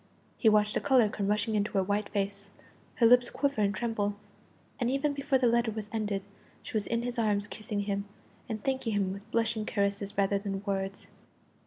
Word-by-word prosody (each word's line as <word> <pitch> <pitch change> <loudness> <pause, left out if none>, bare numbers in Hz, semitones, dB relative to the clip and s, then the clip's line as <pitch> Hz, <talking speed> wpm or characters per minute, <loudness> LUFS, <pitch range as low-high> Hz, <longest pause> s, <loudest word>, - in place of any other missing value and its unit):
He 225 - +4
watched 210 0 +3
the - - 0
colour 250 -6 +4
come 200 -1 -2
rushing 210 +2 +1
into 210 0 0
her 195 -2 +3
white 205 +2 -1
face, 200 0 -3 0.5
her 235 - +4
lips 245 +1 +6
quiver 280 -6 0
and 200 -1 +3
tremble, 205 -1 -1 0.6
and 245 -2 +1
even 275 +2 +1
before 280 -1 +1
the 255 - +1
letter 235 0 +3
was 215 -1 -5
ended 205 -3 -1 0.4
she - - -9
was 210 -2 0
in 235 0 0
his 245 0 -3
arms 205 -2 +1
kissing 210 -1 -4
him, 200 0 -2 0.4
and 215 -2 -4
thanking 260 -4 -1
him 195 -2 0
with 200 +2 -10
blushing 225 -1 +1
caresses 200 -1 -1
rather 200 0 +2
than 195 -1 -4
words. 195 -1 -3
210 Hz, 195 wpm, -30 LUFS, 200-235 Hz, 0.6 s, lips